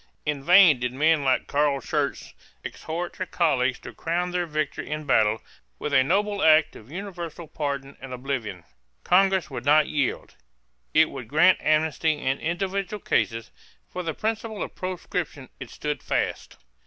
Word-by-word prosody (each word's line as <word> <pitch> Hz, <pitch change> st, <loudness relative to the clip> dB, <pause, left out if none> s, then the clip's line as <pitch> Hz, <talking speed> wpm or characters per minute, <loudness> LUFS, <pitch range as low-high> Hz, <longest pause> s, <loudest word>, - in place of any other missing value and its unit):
In 145 Hz, -2 st, -2 dB
vain 175 Hz, -4 st, +7 dB
did 125 Hz, 0 st, -2 dB
men 155 Hz, +2 st, +3 dB
like 130 Hz, -1 st, +2 dB
Carl 145 Hz, -1 st, +1 dB
Schurz -, -, -2 dB, 0.3 s
exhort 170 Hz, +2 st, -5 dB
their 185 Hz, -, -5 dB
colleagues 130 Hz, -7 st, +1 dB
to -, -, -9 dB
crown 175 Hz, +2 st, -2 dB
their 175 Hz, -1 st, -1 dB
victory 155 Hz, -2 st, -3 dB
in 155 Hz, 0 st, -3 dB
battle 110 Hz, -6 st, +2 dB, 0.3 s
with 150 Hz, -, -4 dB
a 130 Hz, -2 st, +6 dB
noble 200 Hz, +6 st, 0 dB
act 155 Hz, -2 st, +5 dB
of 110 Hz, -, -13 dB
universal 175 Hz, -3 st, -7 dB
pardon 140 Hz, -3 st, -4 dB
and 135 Hz, -1 st, -8 dB
oblivion. 125 Hz, -8 st, -4 dB, 0.4 s
Congress 190 Hz, -2 st, +3 dB
would 130 Hz, -, -5 dB
not 150 Hz, +2 st, +5 dB
yield. 145 Hz, -5 st, -2 dB, 0.6 s
It 160 Hz, 0 st, +5 dB
would 130 Hz, -5 st, -7 dB
grant 160 Hz, +8 st, +4 dB
amnesty 155 Hz, +1 st, +2 dB
in 135 Hz, -1 st, -1 dB
individual 195 Hz, +4 st, -2 dB
cases; 115 Hz, -, -1 dB, 0.4 s
for 180 Hz, -, -4 dB
the 165 Hz, -3 st, -4 dB
principle 220 Hz, -1 st, -3 dB
of -, -, -7 dB
proscription 175 Hz, -6 st, -4 dB
it 135 Hz, -3 st, -8 dB
stood 150 Hz, -1 st, -4 dB
fast. -, -, -2 dB
155 Hz, 155 wpm, -25 LUFS, 135-180 Hz, 0.6 s, vain